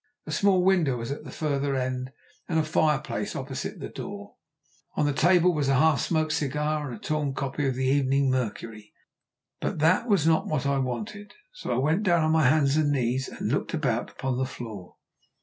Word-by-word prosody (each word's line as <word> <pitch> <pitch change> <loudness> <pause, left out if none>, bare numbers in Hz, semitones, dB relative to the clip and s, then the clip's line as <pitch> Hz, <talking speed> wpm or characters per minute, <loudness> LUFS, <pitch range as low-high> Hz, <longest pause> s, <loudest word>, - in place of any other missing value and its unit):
A 155 - -6
small 185 +3 +3
window 175 -9 +3
was 115 +2 -5
at 140 - -6
the - - -8
further 140 -2 -1
end 130 0 -2 0.4
and 165 - +1
a 160 - +3
fireplace 155 -1 0
opposite - - -5
the - - -5
door. - - -8 0.6
On - - +1
the 145 - +1
table 175 +4 +4
was 145 -3 0
a 135 - +4
half 150 0 +4
smoked 155 -2 0
cigar 150 +1 -1
and 120 - -6
a - - -12
torn 150 -1 -2
copy 135 +1 -2
of 130 - -1
the 130 +1 -1
Evening 135 0 +2
Mercury. 115 -3 -4 0.7
But - - -2
that 165 +9 +3
was 195 -7 +3
not 160 -1 +3
what 145 -3 -1
I 140 0 +1
wanted, 130 - -5 0.2
so - - -6
I - - +1
went 155 +9 +2
down 175 -5 +3
on 155 - +2
my 160 -3 +4
hands 145 -1 +3
and 150 -2 +2
knees 130 -1 0
and 110 - -4
looked 145 - -1
about 125 -7 -1
upon 130 -2 -3
the 130 - +1
floor. 110 -8 -9
145 Hz, 200 wpm, -26 LUFS, 130-155 Hz, 0.7 s, table